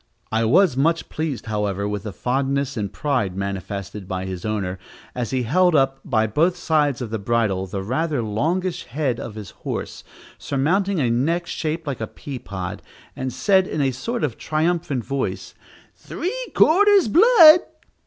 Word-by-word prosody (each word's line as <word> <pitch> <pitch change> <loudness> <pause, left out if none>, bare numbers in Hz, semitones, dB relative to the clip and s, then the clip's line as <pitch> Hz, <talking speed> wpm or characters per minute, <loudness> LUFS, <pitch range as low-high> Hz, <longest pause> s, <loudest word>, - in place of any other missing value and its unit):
I 110 +1 +1
was 165 - +4
much 165 +5 +1
pleased, 155 -5 -4
however, 105 -2 -2
with 105 -1 -3
the 105 +1 -6
fondness 135 +4 -1
and 105 -4 -3
pride 125 -11 -1
manifested 100 0 -5
by 95 -1 -3
his 95 0 -6
owner, 100 -4 -2 0.3
as 125 -3 -3
he 130 -1 -1
held 175 +8 +3
up, 135 -1 +2
by 110 -7 +1
both 165 - +1
sides 150 -6 +1
of 110 - -7
the 110 - -2
bridle, 100 -3 0
the 95 +1 -4
rather 140 +4 -1
longish 165 - -1
head 130 -2 -2
of 110 - -7
his 105 -4 -8
horse, - - -5 0.4
surmounting 185 +7 0
a 125 -5 +1
neck 165 +9 0
shaped 160 0 -3
like 140 -6 -4
a 110 - -2
pea 135 +2 -8
pod, 95 -1 -6 0.3
and 130 0 -3
said, 190 - +2
in - - -3
a 135 -2 +2
sort 230 - -4
of 125 -7 -2
triumphant 155 -5 -1
voice, 135 -1 -3 0.4
"three 365 - -4 0.2
quarters 400 - +5
blood!" 345 - +8
135 Hz, 165 wpm, -22 LUFS, 105-165 Hz, 0.4 s, blood